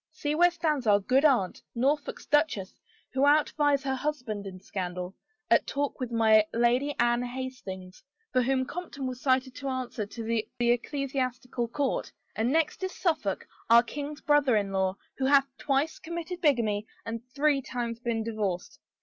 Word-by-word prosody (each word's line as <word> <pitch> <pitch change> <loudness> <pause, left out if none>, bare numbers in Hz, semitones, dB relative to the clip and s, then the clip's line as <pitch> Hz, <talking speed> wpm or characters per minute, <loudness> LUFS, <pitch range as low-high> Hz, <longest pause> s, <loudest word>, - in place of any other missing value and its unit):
See 300 -1 -2
where 350 +3 +5
stands 310 -7 -1
our 205 -1 +6
good 255 +7 +2
aunt, 250 -11 +3
Norfolk's 280 +5 0
duchess, 295 -11 +1 0.4
who 265 - 0
outvies 290 -1 +3
her 265 -1 0
husband 250 -8 -3
in 185 -1 -8
scandal, 180 -1 -5 0.4
at - - +4
talk 285 0 -2
with 250 -2 -3
my 220 -2 +5
Lady 245 +5 +2
Anne 240 0 +3
Hastings, 245 -8 -6 0.3
for 255 - +4
whom 260 +1 +1
Compton 285 -3 -6
was 255 -1 -4
cited 260 -1 +2
to 275 - -5
answer 250 -5 -3
to 230 +2 -7
the 225 -1 -1
ecclesiastical 250 0 -1
court, 275 +4 -1 0.2
and 230 +3 +1
next 320 +2 +1
is 375 - -2
Suffolk, 310 - -1 0.2
our 235 +1 +8
king's 290 +4 -6
brother 290 -4 +4
in 200 -2 0
law, 190 0 0 0.2
who 265 - +1
hath 275 0 +6
twice 285 +3 0
committed 340 +2 -5
bigamy 220 - +2 0.2
and 230 0 -4
three 285 -1 +3
times 240 -3 -4
been 235 -2 -1
divorced. 210 -5 -3
255 Hz, 160 wpm, -28 LUFS, 225-290 Hz, 0.4 s, our